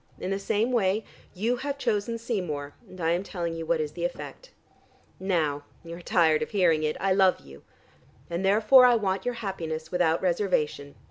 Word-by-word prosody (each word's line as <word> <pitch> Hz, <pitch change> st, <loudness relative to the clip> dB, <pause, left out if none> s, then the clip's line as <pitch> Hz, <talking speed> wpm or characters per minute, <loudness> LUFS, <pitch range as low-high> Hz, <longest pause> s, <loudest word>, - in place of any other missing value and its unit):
In 185 Hz, -, -4 dB
the 195 Hz, -, -1 dB
same 210 Hz, +4 st, 0 dB
way, 215 Hz, -3 st, +1 dB, 0.3 s
you 230 Hz, +6 st, 0 dB
have 280 Hz, +2 st, -4 dB
chosen 230 Hz, -2 st, -1 dB
Seymour, 175 Hz, -, -4 dB, 0.2 s
and 185 Hz, -, -12 dB
I 165 Hz, -1 st, +1 dB
am 175 Hz, +1 st, +1 dB
telling 175 Hz, -4 st, -4 dB
you 165 Hz, -1 st, -6 dB
what 170 Hz, -1 st, +1 dB
is 150 Hz, -1 st, -2 dB
the 170 Hz, +2 st, -6 dB
effect. 340 Hz, -, -6 dB, 0.7 s
Now 160 Hz, -7 st, 0 dB, 0.2 s
you 170 Hz, 0 st, -8 dB
are 175 Hz, -, -10 dB
tired 160 Hz, -3 st, +3 dB
of -, -, -3 dB
hearing 175 Hz, -6 st, +2 dB
it 155 Hz, 0 st, -1 dB
I 195 Hz, -1 st, +2 dB
love 190 Hz, -1 st, +3 dB
you. 70 Hz, +1 st, -14 dB, 0.7 s
And 170 Hz, +2 st, -3 dB
therefore 220 Hz, +6 st, +6 dB
I 245 Hz, -, +5 dB
want 195 Hz, -4 st, -1 dB
your 245 Hz, -1 st, -1 dB
happiness 165 Hz, -7 st, -5 dB
without 170 Hz, -2 st, +2 dB
reservation. 170 Hz, -6 st, -1 dB
185 Hz, 190 wpm, -27 LUFS, 160-205 Hz, 0.7 s, therefore